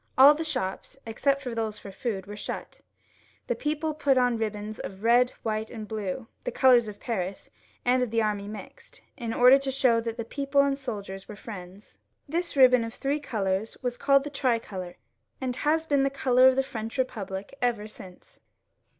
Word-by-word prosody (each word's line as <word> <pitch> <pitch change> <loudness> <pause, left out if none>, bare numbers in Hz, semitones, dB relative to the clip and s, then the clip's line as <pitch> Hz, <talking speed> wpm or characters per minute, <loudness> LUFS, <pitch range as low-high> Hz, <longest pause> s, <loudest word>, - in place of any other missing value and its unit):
All 275 +3 +9
the 315 +2 -3
shops, 195 -3 -3
except 275 +5 0
those 225 -4 -3
for 200 - -10
food, 195 -2 -4
were 205 +1 -8
shut; 210 - -6 0.6
the - - 0
people 305 +1 -2
put 285 -3 +2
on 245 -1 +3
ribbons 215 -1 -4
of 195 +1 -7
red, 240 +2 +5
white, 220 -1 -2
and 220 -2 -7
blue, 215 +2 -4 0.2
the - - -2
old - - -10
colours 250 -4 +5
of 205 -1 -8
Paris 195 -5 -4 0.3
and 250 +1 +3
of 250 - 0
the 230 +1 +1
army 210 -2 -1
mixed, 210 0 -10
in 235 -4 -4
order 250 +4 +7
to 275 0 -3
show 255 -4 +3
that 230 0 -4
the 230 - -4
people 280 +3 -1
arid 280 0 0
soldiers 200 -7 -6
were 210 - -9
Mends. 195 -2 -10 0.3
This 340 +3 -2
ribbon 255 -3 +6
of 230 0 -6
three 280 +2 -1
colours 205 -6 -2
was 245 -1 -1
called 275 +1 +3
the 295 - -6
tricolor, 225 -9 -2 0.4
and 255 -2 -2
has 315 +2 +1
been 285 -3 +2
the 275 - +2
colour 260 -2 +4
of 260 - +5
the 270 - +2
French 225 -1 -6
Bepublic 200 -6 -3
ever 230 -4 0
since. 185 -4 -14
235 Hz, 190 wpm, -27 LUFS, 210-270 Hz, 0.6 s, All